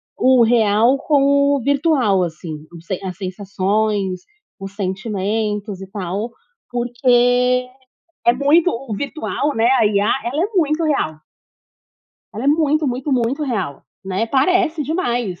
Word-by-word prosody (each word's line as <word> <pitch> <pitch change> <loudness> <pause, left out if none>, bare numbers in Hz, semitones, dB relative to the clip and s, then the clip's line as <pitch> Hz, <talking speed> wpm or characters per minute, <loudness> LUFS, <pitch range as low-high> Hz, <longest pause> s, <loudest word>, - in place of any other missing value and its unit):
o 255 -1 +4
real 225 +2 +3
com 280 -1 +3
o 270 - -2
virtual, 275 - +2
assim, 160 -2 -6 0.2
os 165 - -15
sen 190 -2 -3
as 185 -2 -5
sensações, 195 0 -1 0.4
os 195 0 -8
sentimentos 205 +1 -3
e 190 - -9
tal, 200 +3 -4 0.4
porque 245 +1 +2 0.6
é 235 - +7
muito 300 +6 +3
o 230 -2 -5
virtual, 285 +3 -3
né, 230 +2 +3
a 215 - +4
IA 205 +1 +2
ela 290 +7 -1
é 410 - -2
muito 320 -2 +1
real. 215 - 0 1.2
Ela 225 - -5
é - - 0
muito, 305 0 +2
muito, 260 +3 -2
muito 255 +4 0
real, 200 - -3 0.2
né, 195 +4 -1
parece 310 +4 +1
demais, 245 - -2
235 Hz, 135 wpm, -19 LUFS, 200-280 Hz, 1.2 s, é